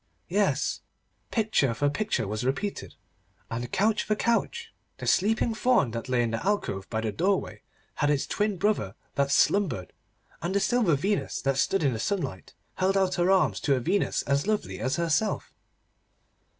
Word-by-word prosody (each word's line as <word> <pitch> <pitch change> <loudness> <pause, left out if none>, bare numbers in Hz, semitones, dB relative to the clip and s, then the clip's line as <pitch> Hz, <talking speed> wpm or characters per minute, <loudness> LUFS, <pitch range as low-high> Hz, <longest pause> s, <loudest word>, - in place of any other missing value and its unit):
Yes, - - +1 0.5
picture 210 - +1
for 145 - +1
picture 205 - -1
was 105 +3 -3
repeated, 140 +11 -3 0.6
and 120 +1 -4
couch 215 +2 +2
for 215 - 0
couch. 235 +2 -1 0.2
The - - -7
sleeping 225 +4 +2
Faun 220 - +2
that 115 +2 -5
lay 125 -1 +2
in 115 - -1
the 115 - -3
alcove 180 - -1
by 110 -1 -1
the 110 -1 -1
doorway 185 - -1 0.3
had 145 - 0
its 145 -2 +1
twin 210 -2 -1
brother 180 - 0 0.2
that 140 0 +1
slumbered, 145 - +2 0.5
and 175 +4 -2
the - - +4
silver 215 -7 +2
Venus 195 +9 -1
that 135 -1 +1
stood 195 +3 +1
in 135 -3 +2
the 110 - -4
sunlight 140 - -3 0.2
held 190 +1 +2
out 190 -1 +2
her 175 0 +1
arms 190 -1 +3
to 140 - +2
a - - 0
Venus 185 +10 0
as 140 +5 0
lovely 215 -1 -1
as 130 +2 0
herself. 170 +6 0
170 Hz, 170 wpm, -27 LUFS, 130-205 Hz, 0.6 s, the